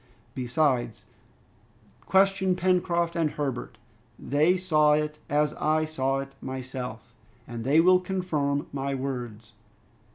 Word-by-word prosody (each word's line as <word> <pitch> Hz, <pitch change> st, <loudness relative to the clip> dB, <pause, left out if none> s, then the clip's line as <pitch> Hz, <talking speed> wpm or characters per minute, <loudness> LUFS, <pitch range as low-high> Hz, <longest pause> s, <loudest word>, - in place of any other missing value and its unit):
Besides; 125 Hz, -2 st, 0 dB, 1.0 s
question 190 Hz, -1 st, +3 dB
Pencroft 175 Hz, -2 st, +1 dB
and 165 Hz, -2 st, +1 dB
Herbert. 135 Hz, -7 st, -4 dB, 0.4 s
They 155 Hz, +6 st, +2 dB
saw 155 Hz, -5 st, +3 dB
it 150 Hz, 0 st, -1 dB
as 150 Hz, +1 st, +1 dB
I 155 Hz, +1 st, +1 dB
saw 135 Hz, -3 st, -1 dB
it 135 Hz, 0 st, -6 dB
myself, 125 Hz, -3 st, -6 dB, 0.3 s
and 120 Hz, -1 st, -6 dB
they 140 Hz, +6 st, +4 dB
will 180 Hz, +2 st, +6 dB
confirm 165 Hz, -7 st, -1 dB
my 140 Hz, 0 st, -2 dB
words." 120 Hz, -5 st, -5 dB
150 Hz, 110 wpm, -27 LUFS, 130-170 Hz, 1.0 s, will